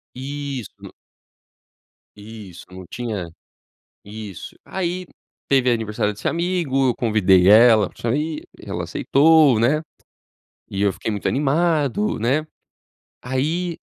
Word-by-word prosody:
Isso. 140 -2 -6
N - - -9 1.3
Isso, 105 -4 -11
não 95 0 -10
tinha 110 -8 -5 0.8
isso. 105 -2 -9
Aí, 185 -1 -3 0.4
teve 130 -2 +3
aniversário 105 -2 -1
desse 105 - -4
amigo, 170 -7 0
eu - - -2
convidei 95 -5 +3
ela 110 -2 +6
pra - - -18
sair, 150 +7 -2 0.2
ela - - -4
aceitou, 150 -3 +4
né. 135 +7 +2 0.9
E 100 - -4
eu 100 -1 +2
fiquei 110 - -4
muito 105 -2 -3
animado, 150 - 0
né. 135 +7 0 0.8
Aí 160 +7 -2
125 Hz, 110 wpm, -21 LUFS, 105-155 Hz, 1.3 s, ela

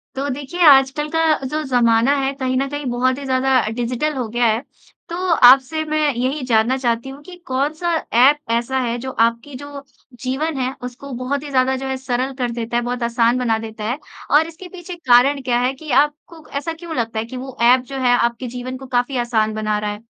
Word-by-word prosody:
तो 275 +1 -2
देखिए, 290 +6 -7
आजकल 275 0 +5
का 325 - +3 0.2
जो 305 +4 -2
ज़माना 235 0 +3
है, 270 0 0
कहीं 260 -2 -2
न 275 - 0
कहीं 290 0 -5
बहुत 255 +2 +1
ही 280 - -7
ज़्यादा 265 0 +1 0.2
डिजिटल 250 +6 -1
हो 250 -3 -2
गया 240 +2 0
है। 225 0 +2 0.5
तो 335 - -4 0.3
आपसे 270 +5 +5
मैं 310 0 -1
यही 260 +5 -2
जानना 225 +4 +3
चाहती 240 0 -1
हूँ 275 +2 -10
कि 360 +3 -11
कौन-सा 300 +6 -1 0.3
ऐप 275 +4 +6
ऐसा 235 +3 0
है, 240 -2 -1
जो 260 +2 -5
आपकी 230 +4 0
जो 285 +1 -9 0.4
जीवन 280 +4 -2
है, 260 0 -1
उसको 250 +3 -8
बहुत 280 +2 -2
ही 295 - -7
ज़्यादा 260 -1 +2
जो - - -3
है 265 0 -2
सरल 260 0 -2
कर 245 -1 -1
देता 235 0 -3
है, 240 - 0
बहुत 245 0 -3
आसान 235 +1 +2
बना 235 -3 +1
देता 220 -1 -9
है। 255 +5 -2 0.3
और 305 +3 +5
इसके 330 +3 -11
पीछे 355 0 -9
कारण 275 -2 +4
क्या 245 -2 0
है 250 +2 +1
कि 295 +1 -9
आपको 310 +2 -14
ऐसा 285 +4 -3
क्यों 325 0 -8
लगता 230 -2 -2
है 220 - -3
कि 255 +3 -8
वो 260 0 -8 0.2
ऐप 255 - +2
जो - - -3
है 245 - +5
आपके 235 +2 -1
जीवन 255 +1 -5
को 265 - -10
काफ़ी 250 +2 0
आसान 220 -2 +1
बना 215 -1 -1
रहा 210 0 -2
है? 210 +2 -10
260 Hz, 220 wpm, -20 LUFS, 240-285 Hz, 0.5 s, ऐप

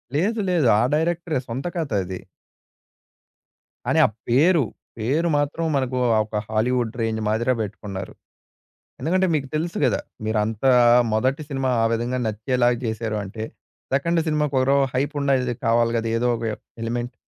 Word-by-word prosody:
లేదు. 210 +9 +1
లేదు. 170 -7 +3
ఆ - - +3
డైరెక్టరే 165 -1 0
సొంత 125 +4 -4
కథ 160 -4 -2
అది. 95 0 -6 1.7
కానీ - - +2
ఆ - - +5 0.2
పేరు, 155 +6 +4 0.3
పేరు 140 +10 0
మాత్రం 145 +3 -1
మనకు 130 -2 0 0.3
ఒక 105 0 -3
హాలీవుడ్ 115 +1 0
రేంజ్ 110 -1 -1
మాదిరా 115 +4 +1
పెట్టుకున్నారు. 100 -2 -6 0.9
ఎందుకంటే 185 +7 +2
మీకు 145 -3 0
తెలుసు 165 +3 -2
గదా! 125 - +2 0.2
మీరంతా 110 +3 +1 0.4
మొదటి 130 +7 +1
సినిమా 135 -2 -1
ఆ - - +3
విధంగా 120 +2 -1
నచ్చేలాగా 120 +3 +1
చేశారు 110 -1 -2
అంటే. 110 +3 -6 0.5
సెకండ్ 170 +5 +2
సినిమాకి 150 -2 0
ఒరో 135 +2 +3 0.2
హైప్‌ 140 +4 0
వుండేది 130 -3 +1
కావాలి 115 0 +3
గదా! 115 0 -2
ఏదో 125 +1 +1
ఒక 115 - -8 0.4
ఎలిమెంట్. 120 +2 -3
125 Hz, 140 wpm, -23 LUFS, 115-150 Hz, 1.7 s, ఆ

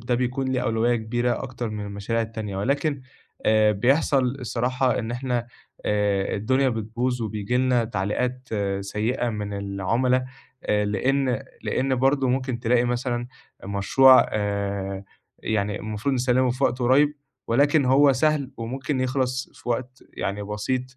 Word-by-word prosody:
ده 120 +2 -1
بيكون 130 +2 -1
له 130 - 0
أولوية 115 +2 +1
كبيرة 120 +2 -1
أكتر 125 -3 -5
من 105 -1 -5
المشاريع 100 +3 -2
التانية 110 -3 -5
ولكن 140 +7 0 0.5
آآ 110 -1 +4
بيحصل 135 +5 +2 0.2
الصراحة 125 +2 0
إن 115 -1 -3
إحنا 120 -1 -2 0.4
آآ 105 -2 +1
الدنيا 130 +6 +2
بتبوظ 120 +2 -2
وبييجي 110 +2 -2
لنا 125 -2 +2
تعليقات 125 +5 -2 0.3
سيّئة 110 +5 -1
من 105 -2 -4
العُمَلا 100 +6 0 0.4
آآ 105 0 +1
لإن 125 +4 0 0.2
لإن 135 0 0
برضه 135 +1 +2
ممكن 130 -1 -1
تلاقي 120 0 +2
مثلًا 120 0 -1 0.4
مشروع 100 +7 +5
آآ 100 -2 -2 0.3
يعني 105 -1 -1
المفروض 110 +6 -2
نسلِّمه 125 0 +2
في 130 +3 -1
وقت 125 - +1
قريّب 135 +4 +3 0.3
ولكن 140 +4 +3
هو 135 +2 +5
سهل 145 0 +1
وممكن 130 +4 -3
يخلص 130 0 -1
في - - -11
وقت 125 +2 -3
يعني 100 +1 -3
بسيط 105 +5 -2
120 Hz, 135 wpm, -24 LUFS, 105-130 Hz, 0.5 s, مشروع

